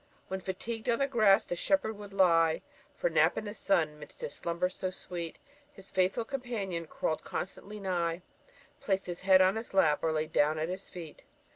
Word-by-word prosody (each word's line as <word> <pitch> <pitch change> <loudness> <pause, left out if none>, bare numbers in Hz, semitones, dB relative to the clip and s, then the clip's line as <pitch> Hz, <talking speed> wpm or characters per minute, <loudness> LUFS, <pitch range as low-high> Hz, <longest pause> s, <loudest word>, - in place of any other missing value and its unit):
When 190 0 -3
fatigued 220 +5 -4
on 230 - +3
the 275 - +2
grass 215 -7 +4
the 175 - -3
shepherd 220 +3 +1
would 205 -1 -10
lie 165 -4 +4 0.3
For - - -6
a - - +5
nap - - +4
in - - -2
the 205 - -5
sun, 160 -8 +1
'midst 150 - -12
his 145 - -4
slumbers 170 +2 -1
so 185 - -3
sweet 175 -2 -6 0.4
His 195 -5 -15
faithful 190 +5 +1
companion 215 - -3
crawl'd 155 - -2
constantly 205 +3 -5
nigh, 175 -3 -1 0.6
Placed 195 -1 0
his 175 -1 -5
head 190 0 +6
on 190 +3 +3
his 225 -3 -6
lap, 155 -6 +4
or 160 - +1
laid 155 0 -1
down 150 +2 +3
at 160 +2 -1
his 185 +1 -6
feet. 165 -4 -10
185 Hz, 195 wpm, -31 LUFS, 170-205 Hz, 0.6 s, head